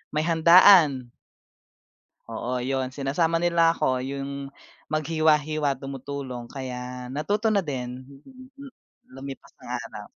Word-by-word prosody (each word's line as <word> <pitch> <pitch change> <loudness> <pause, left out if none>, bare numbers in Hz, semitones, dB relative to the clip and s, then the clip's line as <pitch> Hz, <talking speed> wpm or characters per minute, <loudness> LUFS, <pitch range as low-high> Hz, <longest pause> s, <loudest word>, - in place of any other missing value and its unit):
may 155 - +1
handaan. 165 -5 +6 1.2
Oo, 120 +3 -4
'yon. 130 0 -1
Sinasama 145 +5 -1
nila 170 -1 +3
ako 130 -1 0
yung 140 +1 -5 0.4
maghiwa-hiwa, 155 -2 +1
tumutulong 135 -2 -7
kaya 125 -1 -7
natuto 205 - 0
na 205 - +3
din. 130 -6 -5
Mm, 135 +2 -16 0.3
mm. 275 -2 -11 0.4
Lumipas 135 0 -10
ang - - -13
araw. - - -8
140 Hz, 110 wpm, -25 LUFS, 130-160 Hz, 1.2 s, handaan